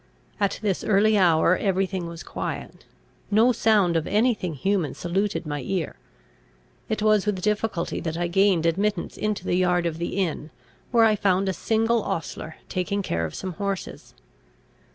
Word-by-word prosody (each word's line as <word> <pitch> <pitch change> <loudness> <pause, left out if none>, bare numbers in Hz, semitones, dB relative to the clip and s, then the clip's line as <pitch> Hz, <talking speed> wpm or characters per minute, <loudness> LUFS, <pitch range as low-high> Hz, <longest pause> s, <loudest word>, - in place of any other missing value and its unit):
At 200 -1 +1
this 195 -4 0
early 215 +1 +3
hour 175 -2 +4
every 195 0 +1
thing 185 -2 -4
was 170 -1 -8
quiet; - - -6 0.4
no 220 +4 +5
sound 210 -7 +3
of 160 -1 0
any 230 +5 +3
thing 180 -7 -5
human 180 -1 0
saluted 180 -1 -1
my 145 -1 -3
ear. 180 +3 -3 0.9
It 215 -1 -1
was 215 -1 +3
with 190 -3 -1
difficulty 210 -4 -1
that 160 -1 -4
I 175 - 0
gained 185 -1 +3
admittance 195 +3 0
into 215 -1 -2
the - - 0
yard 180 -1 +2
of 165 -1 -2
the 170 +2 -3
inn, 165 -5 -2 0.4
where 230 -2 +5
I 215 -1 +4
found 195 -1 +1
a 190 - +1
single 225 +3 +1
ostler 160 -3 -4
taking 200 +2 -2
care 85 - -1
of 80 - -6
some 185 -1 -5
horses. 195 +1 -5
190 Hz, 170 wpm, -25 LUFS, 170-210 Hz, 0.9 s, no